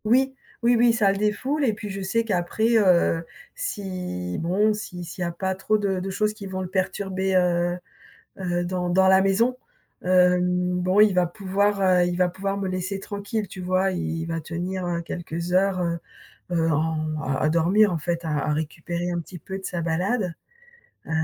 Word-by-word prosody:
Oui, 265 +4 +3 0.3
oui 240 +1 +5
oui, 235 0 +5
ça 210 -4 +3
le 195 - -2
défoule 255 +8 0
et 235 -5 +3
puis 210 0 -7
je 195 0 -5
sais 210 +5 0
qu'après, 220 +4 +1
heu, 175 -5 +3 0.3
si, 185 - -4
bon, 200 +6 +2
si 180 -4 -6
s'il 170 +2 -8
y - - +1
a 170 - -2
pas 190 +2 -2
trop 195 +3 +1
de 195 -3 -1
de 190 +1 -4
choses 210 +2 0
qui 210 -2 -8
vont 190 0 -4
le - - -4
perturber 190 0 -1
heu, 175 -1 +2 0.6
heu, 175 -1 -1
dans 180 0 -2
dans 190 +2 +4
la 190 0 +6
maison 225 +6 +2 0.5
hem, 180 0 +3
bon, 185 +2 +1
il 210 -2 +6
va 180 -1 +3
pouvoir 200 +2 0
heu, 185 -2 +4
il 175 0 -1
va 180 0 +3
pouvoir 195 +2 -3
me 200 - -2
laisser 185 +1 -3
tranquille 205 +2 -4
tu 185 - -9
vois? 185 +1 +1
Il 180 - -2 0.2
il - - -4
va 165 0 -2
tenir 175 +4 -4
heu 170 -1 -1
quelques 170 0 -5
heures, 190 0 +2
heu, 170 -1 -1 0.5
heu, 165 -2 +2
en 155 0 -1
à 135 -2 -1
à - - +3
dormir 180 +6 +4
en 170 - 0
fait, 170 +2 -2
à 160 - -3
à 150 +1 0
récupérer 165 +3 -3
un 175 -1 -1
petit 175 +2 -9
peu 190 +4 -6
de 190 - -8
sa 175 -2 -3
balade. 180 +3 -1 0.7
Heu, - - -10
185 Hz, 205 wpm, -24 LUFS, 175-200 Hz, 0.7 s, la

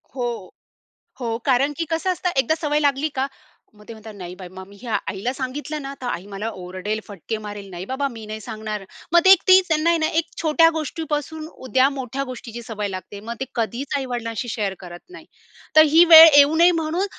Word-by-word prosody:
हो, 245 -2 -2 0.9
हो, 230 -2 -2
कारण 270 +2 +2
की 335 - -2
कसं 330 +3 0
असतं, 360 0 -2
एकदा 270 +5 +2
सवय 295 0 +1
लागली 285 +1 +1
का 265 - 0 0.5
मग 210 - -17
ते 230 - -8
म्हणतात, 220 0 -11
"नाही 180 -2 -8
बाई, 185 -1 -10
मग 190 0 -10
मी 200 - -16
हे 245 - -10
आईला 215 +2 -2
सांगितलं 285 +3 -5
ना, 275 0 -6
तर 255 - -6
आई 190 -6 -4
मला 205 +2 -5
ओरडेल, 185 +4 -4
फटके 205 +2 -6
मारेल. 205 -2 -8
नाही 175 +1 -7
बाबा, 265 +5 -2
मी 225 -2 -9
नाही 215 +1 -7
सांगणार". 215 -2 -6 0.3
मग 345 - +8
ते 380 - +8
एक 380 - +7
तीच 370 0 +6
त्यांना 315 0 +1
आहे 340 - +3
ना, 315 - +1
एक 335 - -2 0.2
छोट्या 330 +1 +4
गोष्टीपासून 315 0 -4 0.2
उद्या 260 +1 +3
मोठ्या 265 +1 -4
गोष्टीची 240 -2 -8
सवय 210 -2 -4
लागते. 190 +1 -8
मग 225 +3 -6
ते 265 - -2
कधीच 240 +5 -3
आई-वडिलांशी 240 -3 -4
शेअर 205 -4 -2
करत 175 -1 -10
नाही. 365 - -13 0.5
तर 310 - +9
ही 330 +2 +7
वेळ 325 -1 +11
येऊ 290 +2 +6
नये, 345 +2 +6
म्हणून 325 +5 -1
255 Hz, 210 wpm, -22 LUFS, 215-310 Hz, 0.9 s, वेळ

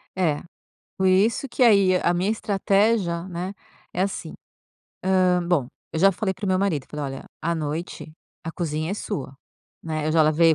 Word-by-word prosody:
É, 165 -6 0 0.5
por 190 - +2
isso 205 +8 +3
que 255 - +2
aí, 200 -5 +5
a 175 - +3
minha 180 +3 0
estratégia, 200 -4 +1
né, 180 +1 -4 0.4
é 180 - -2
assim, 190 -4 -4 0.8
hã 180 -1 +3
bom, 170 -8 +2 0.3
eu - - -2
já 195 +3 +5
falei 190 +1 -2
para 190 - -7
o - - -1
meu 185 0 +2
marido, 185 -8 0
eu - - -31
falei: 150 -1 -4
"Olha, - - -12 0.2
à 170 +1 0
noite 155 +1 -4 0.3
a 165 - -4
cozinha 155 -1 -2
é - - -1
sua, 145 -11 -5 0.5
né. 155 -2 -3
Eu 155 - +1
já 165 - +5
lavei 160 +1 +4
180 Hz, 190 wpm, -24 LUFS, 160-195 Hz, 0.8 s, aí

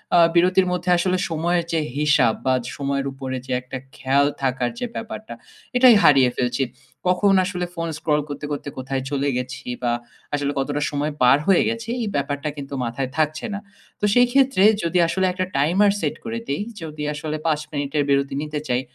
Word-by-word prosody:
আ - - +7 0.2
বিরতির 185 +2 +4
মধ্যে 180 0 -2
আসলে 185 +1 +1
সময়ের 170 +2 0
যে 165 - +2 0.2
হিসাব 145 -6 +3
বা 130 - +3 0.2
সময়ের 140 -1 -1
উপরে 130 -1 -5
যে 130 - -7
একটা 125 +1 -7 0.2
খেয়াল 140 +2 +2
থাকার 125 -2 0
যে 250 - -2
ব্যাপারটা 220 -1 -6 0.4
এটাই 250 -2 +8
হারিয়ে 135 -3 +6
ফেলছি। 125 +1 0 0.4
কখন 185 +2 +3
আসলে 180 -2 -2
ফোন 165 0 -2
স্ক্রল 150 -1 +1
করতে, 145 +1 -5
করতে, 145 0 -4
কোথায় 130 0 -3
চলে 140 0 0
গেছি 130 +2 -5 0.2
বা 120 - +2 0.4
আসলে 145 -1 0
কতটা 145 +2 -1
সময় 145 +1 -1
পার 125 +2 +6
হয়ে 195 -2 +5
গেছি 230 0 -4
এই 225 - -1
ব্যাপারটা 145 +1 -1
কিন্তু 140 0 -7
মাথায় 125 +3 -3
থাকছে 155 +2 0
না। 200 - -3 0.4
তো 210 - +1
সেই 245 +1 +5
ক্ষেত্রে 270 -7 +3 0.2
যদি 170 +2 0
আসলে 190 +2 0
একটা 185 0 -1
টাইমার 180 +9 +4
সেট 155 -3 -1
করে 230 0 -3
দেই। 140 - -1 0.2
যদি 155 -2 -6
আসলে 155 +1 -4
৫ 155 -2 +2
মিনিটের 145 0 -1
বিরতি 140 0 +2
নিতে 150 0 -4
চাই 125 +1 +2
150 Hz, 185 wpm, -22 LUFS, 135-180 Hz, 0.4 s, এটাই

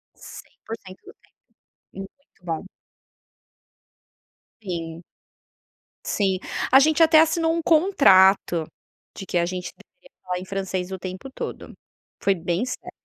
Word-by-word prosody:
100% 195 -4 -11
do - - -13
tempo. - - -56 0.7
Muito 195 - -13
bom. 165 +2 -4 2.0
Sim. 170 -3 -6 1.0
Sim. 190 -3 0 0.3
A 265 - +9
gente 315 +3 +3
até 320 -1 +7
assinou 325 0 +2
um 335 - -2
contrato 195 - +4 0.5
de 195 - -8
que - - -4
a 170 - +2
gente 180 0 -5
deveria - - -22
falar 180 0 -3
em - - -8
francês 190 -1 -4
o 190 - -5
tempo 185 +8 -7
todo. - - -7 0.5
Foi 195 - +3
bem 175 +4 -2
sério. 255 - -7
195 Hz, 125 wpm, -23 LUFS, 180-285 Hz, 2.0 s, A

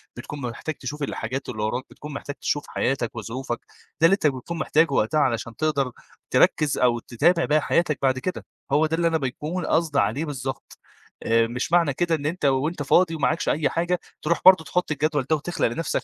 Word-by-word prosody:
بتكون 140 +4 -7
محتاج 125 +5 -4
تشوف 145 +3 -6
الحاجات 135 0 -4
اللي 110 -3 -4
وراك، 120 +4 -1
بتكون 150 0 -9
محتاج 140 0 -6
تشوف 145 - -2
حياتك 125 -3 -1
وظروفك، 120 +2 -4 0.4
ده - - +7
اللي 175 - +6
أنت 195 -6 +2
بتكون 140 +5 -3
محتاجه 160 0 +2
وقتها 135 +6 +2
علشان 115 -4 0
تقدر 140 -2 0 0.4
تركّز 150 -2 +3
أو 120 -2 +3
تتابع 170 +10 +2
باقى 150 +1 +2
حياتك 155 -1 +1
بعد 130 -1 +2
كده، 185 +7 -4 0.3
هو 150 +3 +4
ده 160 +1 0
اللي 170 0 +2
أنا 165 -1 +2
بيكون 150 +5 -3
قصدي 160 -3 +1
عليه 115 +10 0
بالضبط. 135 -3 -6 0.4
آآ، 115 0 +3
مش 125 +6 -4
معنى 170 -5 +4
كده 170 +3 +1
إن 145 -2 -6
أنت 155 0 -2
وأنت 145 +4 +1
فاضي 165 +4 +3
ومعكش 160 +3 0
أي 150 -1 +1
حاجة 175 +1 0 0.2
تروح 170 +2 0
برضه 185 -3 +8
تحط 180 +1 -1
الجدول 150 -2 0
ده 160 - +4
وتخلق 170 +2 -1
لنَفْسك 135 +6 -2
145 Hz, 195 wpm, -24 LUFS, 130-165 Hz, 0.4 s, برضه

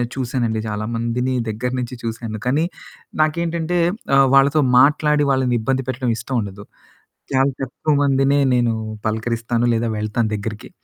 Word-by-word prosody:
చూసానండి, 120 -4 -1
చాలామందిని 115 +4 -2 0.2
దగ్గర 115 +4 -3
నుంచి 125 0 -5
చూసాను, 115 -1 -4
కానీ 145 +6 +2 0.6
నాకేంటంటే 170 +2 -1 0.4
ఆహ్, 135 0 +6
వాళ్ళతో 140 +3 +5 0.2
మాట్లాడి 150 +1 +3
వాళ్ళనిబ్బంది 130 0 0
పెట్టడం 130 -1 -1
ఇష్టముండదు. 105 -4 -4 0.7
చాలా 135 +1 +3
తక్కువ 135 +4 -1
మందిని 135 0 +3 0.2
నేను 120 -2 +2 0.3
పలకరిస్తాను, 115 +2 -1
లేదా 115 0 0
వెళ్తాను 110 +1 -1
దగ్గరికి, 105 +1 -6
125 Hz, 115 wpm, -20 LUFS, 115-135 Hz, 0.7 s, ఆహ్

